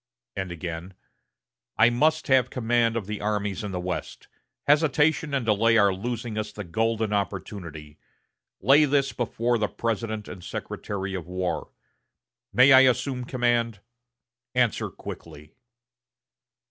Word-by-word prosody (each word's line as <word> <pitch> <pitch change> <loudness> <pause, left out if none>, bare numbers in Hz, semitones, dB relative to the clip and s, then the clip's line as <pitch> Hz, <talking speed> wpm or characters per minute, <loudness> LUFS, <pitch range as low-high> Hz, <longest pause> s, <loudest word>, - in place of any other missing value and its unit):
And 95 -2 -4
again: 85 +2 -6 0.8
"I 110 +2 +6
must 155 +6 +2
have 130 -2 +4
command 115 -1 +1
of 110 - -3
the 105 +1 -5
armies 105 -1 -2
in 105 - -4
the 90 - -3
West. 90 0 -5 0.4
Hesitation 150 +1 +3
and 130 -4 -1
delay 115 +1 +3
are 100 -2 +4
losing 115 +2 -4
us 105 0 -4
the 105 0 -7
golden 110 +4 -1
opportunity. 85 -6 -5 0.6
Lay 140 +8 +5
this 140 -1 +1
before 120 0 -1
the 105 - +1
President 110 -1 -3
and 90 - -9
Secretary 95 +1 -5
of 90 -3 -5
War. 90 0 -3 0.8
May 125 +5 +6
I 130 - +10
assume 130 0 +2
the 125 - -5
command? 120 -4 0 0.8
Answer 120 -3 +1
quickly." 75 +2 -10
110 Hz, 135 wpm, -26 LUFS, 95-125 Hz, 0.8 s, I